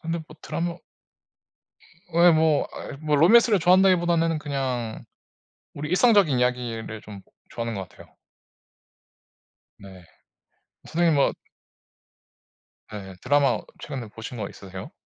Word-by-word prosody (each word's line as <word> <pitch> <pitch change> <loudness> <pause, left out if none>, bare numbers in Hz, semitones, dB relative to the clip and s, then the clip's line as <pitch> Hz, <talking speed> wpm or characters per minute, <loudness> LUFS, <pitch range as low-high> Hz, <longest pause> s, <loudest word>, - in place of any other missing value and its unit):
근데 165 +1 -3
뭐 - - -15
드라마 170 0 -3 1.4
예 170 +1 +7
뭐. 160 -2 +2
아이 - - -8
뭐 150 0 0
로맨스를 210 - +5
좋아한다기보다는 175 -2 +3
그냥 130 -6 -3 0.7
우리 150 +1 -6
일상적인 190 - +4
이야기를 120 -3 -2
좀 105 -2 -11 0.3
좋아하는 115 -1 -4
것 95 - -6
같아요. - - -17 1.7
네. 95 -2 -13 0.8
선생님 165 0 +1
뭐 140 - +2 1.6
네. 100 -3 -8
드라마 145 -1 +2 0.2
최근에 130 -6 -6
보신 115 +3 -9
거 105 -4 -4
있으세요? 95 -1 -10
145 Hz, 250 characters per minute, -24 LUFS, 115-170 Hz, 1.7 s, 예